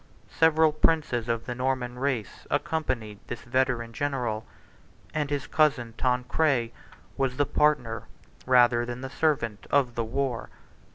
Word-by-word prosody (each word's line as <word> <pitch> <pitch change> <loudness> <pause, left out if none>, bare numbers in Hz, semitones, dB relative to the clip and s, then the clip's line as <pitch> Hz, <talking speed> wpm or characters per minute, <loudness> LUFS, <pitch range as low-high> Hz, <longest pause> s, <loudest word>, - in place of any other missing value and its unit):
Several 160 -1 +4
princes 150 -7 +1
of 115 0 -1
the 120 - -3
Norman 125 -1 -2
race 130 -6 -2
accompanied 130 -8 -2
this 120 - -6
veteran 120 -2 0
general; 125 -5 -2 0.7
and 150 -2 -1
his 145 -2 -2
cousin 135 -7 +2
Tancred 125 0 +1
53 - - -31 0.4
was 135 -2 0
the 145 - +3
partner, 140 -6 +1 0.4
rather 120 -2 +5
than 120 +1 -5
the 130 -1 -6
servant, 130 -10 0
of 130 -4 +2
the 115 - -1
war. 125 +1 -2
125 Hz, 135 wpm, -27 LUFS, 120-145 Hz, 0.7 s, rather